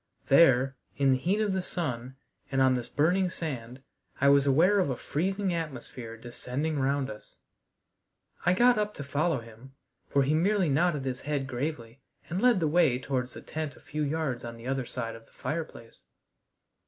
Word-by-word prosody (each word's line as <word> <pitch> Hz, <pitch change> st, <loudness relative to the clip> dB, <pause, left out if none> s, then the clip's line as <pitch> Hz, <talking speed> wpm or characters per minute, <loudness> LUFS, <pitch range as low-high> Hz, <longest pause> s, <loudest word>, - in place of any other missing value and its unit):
There, 135 Hz, -3 st, +5 dB, 0.2 s
in 140 Hz, -1 st, +4 dB
the 130 Hz, -, +4 dB
heat 190 Hz, +9 st, +1 dB
of 205 Hz, -3 st, +1 dB
the 190 Hz, -, 0 dB
sun, 130 Hz, -8 st, -4 dB, 0.4 s
and 135 Hz, -, +1 dB
on 130 Hz, -1 st, +5 dB
this 125 Hz, -2 st, -3 dB
burning 180 Hz, +5 st, +2 dB
sand, 130 Hz, -7 st, -6 dB, 0.4 s
I 140 Hz, -, +5 dB
was 140 Hz, 0 st, +5 dB
aware 175 Hz, +9 st, +5 dB
of 180 Hz, -, +1 dB
a 130 Hz, -, -1 dB
freezing 190 Hz, +4 st, -1 dB
atmosphere 130 Hz, -8 st, -5 dB
descending 125 Hz, +6 st, -3 dB
round 135 Hz, 0 st, +1 dB
us. 105 Hz, -3 st, -10 dB, 1.1 s
I 180 Hz, -, +4 dB
got 240 Hz, +1 st, +5 dB
up 210 Hz, 0 st, -1 dB
to 140 Hz, -, -6 dB
follow 145 Hz, 0 st, 0 dB
him, 115 Hz, +4 st, -14 dB, 0.3 s
for 140 Hz, -, +3 dB
he 140 Hz, +3 st, +1 dB
merely 185 Hz, +2 st, +2 dB
nodded 150 Hz, -1 st, +1 dB
his 130 Hz, -1 st, -2 dB
head 145 Hz, -2 st, -2 dB
gravely 130 Hz, -2 st, -4 dB, 0.3 s
and 180 Hz, +3 st, -1 dB
led 245 Hz, -5 st, +5 dB
the 160 Hz, -, +2 dB
way 155 Hz, -5 st, +4 dB
towards 130 Hz, -1 st, -3 dB
the -, -, -9 dB
tent 155 Hz, -3 st, -4 dB
a -, -, -16 dB
few 150 Hz, +1 st, -5 dB
yards 145 Hz, -4 st, -1 dB
on 115 Hz, 0 st, -7 dB
the 115 Hz, -, -12 dB
other 130 Hz, -1 st, -2 dB
side 115 Hz, -2 st, -4 dB
of 115 Hz, 0 st, -14 dB
the -, -, -27 dB
fireplace. 155 Hz, -8 st, -6 dB
140 Hz, 185 wpm, -29 LUFS, 130-170 Hz, 1.1 s, There